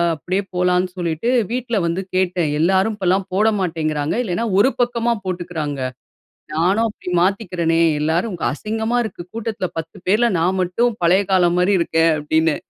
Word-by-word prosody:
அப்படியே 185 +6 -2
போலான்னு" 180 0 +1
சொல்லிட்டு 170 +5 -1 0.2
வீட்டில 240 -2 -1
வந்து 170 +3 -1
கேட்டேன். 180 -4 +1
"எல்லாரும் 190 +5 +2
இப்போலாம் 190 0 +1
போட 210 +3 +3
மாட்டேங்கிறாங்க. 155 -4 -1
இல்லைனா 220 +3 -2
ஒரு 260 - +5
பக்கமா 240 -1 +1
போட்டுக்கிறாங்க. 175 -6 -4 0.7
நானும் 190 +8 +2
அப்படி 205 - -8
மாத்திக்கிறனே, 180 -4 0 0.2
எல்லாரும் 170 +5 0
அசிங்கமா 220 +9 -2
இருக்கு. 185 -4 -7
கூட்டத்தில 225 -4 -3
பத்து 160 0 -8
பேருல 225 +5 +3
நான் 185 +3 +1
மட்டும் 220 +6 0
பழைய 180 +4 +4
காலம் 175 -1 +3
மாரி 190 +3 +3
இருக்கேன்" 165 0 +2
அப்படின்னு. 160 +1 +1
180 Hz, 140 wpm, -20 LUFS, 165-215 Hz, 0.7 s, ஒரு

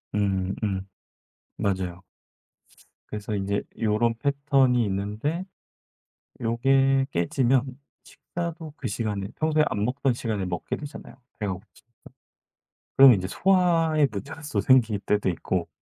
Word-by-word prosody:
음 95 -2 0
음. 95 -2 -2 0.7
맞아요. 95 -3 -2 1.1
그래서 105 0 -4
인제 100 +1 -1 0.2
요런 115 +2 +2
패턴이 140 -3 +2
있는데 105 - -2 1.0
요게 135 +3 +3
깨지면 130 - +1 0.3
식사도 165 -3 -6
그 130 - -4
시간에 100 -2 -3
평소에 155 -1 +3
안 105 0 -1
먹던 130 +1 0
시간에 110 -5 -2
먹게 85 -2 -3
되잖아요, 145 0 -9 0.2
배가 105 -3 -2
고프 95 +4 -9 1.3
그럼 135 -2 +10
인제 95 -3 -1
소화의 165 - +3
문제가 105 +10 -7
또 - - +1
생길 115 -6 +4
때도 105 -1 0
있고 85 - -2
115 Hz, 250 characters per minute, -25 LUFS, 100-140 Hz, 1.3 s, 그럼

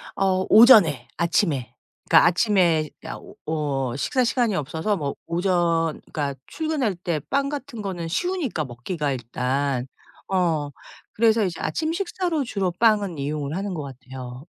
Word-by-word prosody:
어 190 -1 +1
오전에 205 - +7
아침에, 160 - 0 0.4
그러니까 - - +7
아침에 175 -4 +2 0.2
야 - - -5
오 - - -14
어 140 -5 -1
식사 255 - 0
시간이 230 -3 +1
없어서 160 +7 -1
뭐 140 -4 -3
오전 170 -2 0
그러니까 140 -2 -2
출근할 305 - -1
때 170 -2 -2
빵 275 0 +1
같은 275 -6 -6
거는 180 -4 -4
쉬우니까 290 - -1
먹기가 140 +5 -3
일단. 130 +1 -2 0.4
어 170 -6 +1 0.4
그래서 225 0 +3
이제 175 -3 -4
아침 320 0 -1
식사로 350 -4 -1
주로 195 -7 -1
빵은 205 -7 +3
이용을 145 +1 -3
하는 195 +1 -3
것 155 -4 -4
같아요. 130 -1 -9
170 Hz, 305 characters per minute, -24 LUFS, 145-215 Hz, 0.4 s, 오전에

